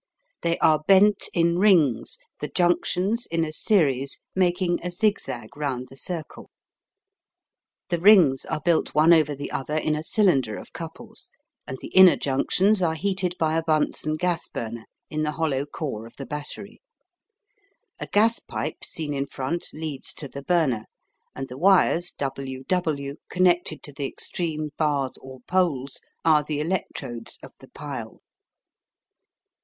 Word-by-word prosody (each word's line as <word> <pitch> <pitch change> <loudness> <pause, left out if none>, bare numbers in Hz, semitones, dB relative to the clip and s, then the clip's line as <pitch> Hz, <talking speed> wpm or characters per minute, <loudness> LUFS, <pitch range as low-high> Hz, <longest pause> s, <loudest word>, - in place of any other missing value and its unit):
They 170 0 0
are 155 -1 +4
bent 200 +1 +5
in 170 0 +2
rings, 170 - +3 0.2
the - - -3
junctions 185 +5 0
in 165 0 0
a 155 - -6
series 140 -8 +1
making 180 -1 +1
a 180 - -3
zig 205 +4 +1
zag 120 +2 -6
round 130 -4 -3
the 135 - -13
circle. 165 +2 -6 1.4
The 175 -2 0
rings 175 -8 +6
are - - -3
built 165 -1 +1
one 155 +3 +6
over 150 -3 +3
the 145 +1 -6
other 150 +3 -2
in 155 0 0
a 150 - -3
cylinder 155 - +2
of - - -11
couples, - - -8 0.4
and 130 - -5
the - - -7
inner 190 -2 +8
junctions 185 +9 +2
are 160 -2 +1
heated 185 0 -1
by 160 -1 +1
a 165 - +2
Bunsen 155 -1 0
gas 175 0 -1
burner 115 0 -6 0.3
in 155 0 -2
the 150 0 -1
hollow 150 -3 -1
core 135 -8 -5
of 115 - -18
the 135 - -7
battery. 150 - -7 1.2
A - - -5
gas 225 +3 +3
pipe - - -5
seen 155 -3 -4
in 140 0 -2
front 150 +6 -3
leads 155 -3 -2
to 145 - -6
the 140 +1 -8
burner, 140 -9 +1 0.5
and 135 - -5
the 125 +1 -9
wires 180 -1 +4
WW 140 +2 -2
connected 175 -4 +1
to 145 - -8
the 140 0 -3
extreme 155 -2 -3
bars 145 -4 0
or 130 -1 -11
poles 145 -5 0 0.3
are 155 -2 +5
the 150 0 -3
electrodes 150 -8 -4
of - - -10
the - - -15
pile. - - -7
155 Hz, 150 wpm, -25 LUFS, 140-180 Hz, 1.4 s, inner